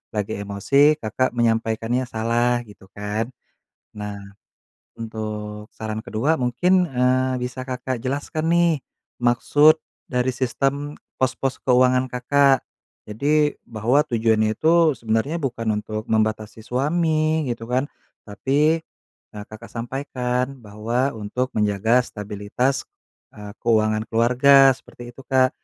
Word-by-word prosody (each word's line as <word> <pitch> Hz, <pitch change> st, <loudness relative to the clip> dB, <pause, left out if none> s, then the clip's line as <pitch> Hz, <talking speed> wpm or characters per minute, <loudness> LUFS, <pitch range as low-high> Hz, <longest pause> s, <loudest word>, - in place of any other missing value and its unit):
lagi 105 Hz, 0 st, -2 dB
emosi 140 Hz, +10 st, +3 dB
Kakak 115 Hz, +4 st, -1 dB
menyampaikannya 115 Hz, +1 st, 0 dB
salah 120 Hz, +1 st, 0 dB
gitu 105 Hz, -3 st, -16 dB
kan. 105 Hz, +2 st, -2 dB, 0.7 s
Nah, 105 Hz, -1 st, -6 dB, 0.8 s
untuk 105 Hz, -1 st, -6 dB
saran 110 Hz, 0 st, -4 dB
ke-2 140 Hz, +9 st, 0 dB
mungkin, 175 Hz, +10 st, +2 dB
eee, 130 Hz, 0 st, +2 dB
bisa 130 Hz, +1 st, -5 dB
Kakak 130 Hz, -1 st, -3 dB
jelaskan 145 Hz, +4 st, -3 dB
nih, 170 Hz, 0 st, +4 dB, 0.5 s
maksud 145 Hz, +6 st, +4 dB, 0.3 s
dari 125 Hz, 0 st, 0 dB
sistem 135 Hz, +3 st, -1 dB, 0.2 s
pos-pos 130 Hz, 0 st, -1 dB
keuangan 125 Hz, 0 st, +3 dB
Kakak. 135 Hz, +2 st, +3 dB, 0.5 s
Jadi, 145 Hz, +7 st, +1 dB
bahwa 120 Hz, +6 st, +1 dB
tujuannya 110 Hz, -2 st, +1 dB
itu 160 Hz, +2 st, +3 dB
sebenarnya 115 Hz, +7 st, -1 dB
bukan 115 Hz, -4 st, -3 dB
untuk 110 Hz, 0 st, -5 dB
membatasi 110 Hz, 0 st, -1 dB
suami 155 Hz, +4 st, +1 dB
gitu 115 Hz, -1 st, -4 dB
kan. 130 Hz, +4 st, 0 dB, 0.4 s
Tapi, 140 Hz, -, +1 dB, 0.6 s
e -, -, -10 dB
Kakak 110 Hz, +2 st, -11 dB
sampaikan 125 Hz, +1 st, -3 dB
bahwa 115 Hz, +6 st, -1 dB
untuk 125 Hz, +5 st, -3 dB
menjaga 105 Hz, +4 st, +2 dB
stabilitas, 105 Hz, +6 st, -2 dB, 0.5 s
eee, 105 Hz, -1 st, -9 dB
keuangan 110 Hz, -1 st, +2 dB
keluarga 130 Hz, +4 st, +5 dB
seperti 120 Hz, -2 st, -12 dB
itu, 135 Hz, -, -12 dB
Kak. 130 Hz, -1 st, +3 dB
125 Hz, 110 wpm, -22 LUFS, 110-135 Hz, 0.8 s, keluarga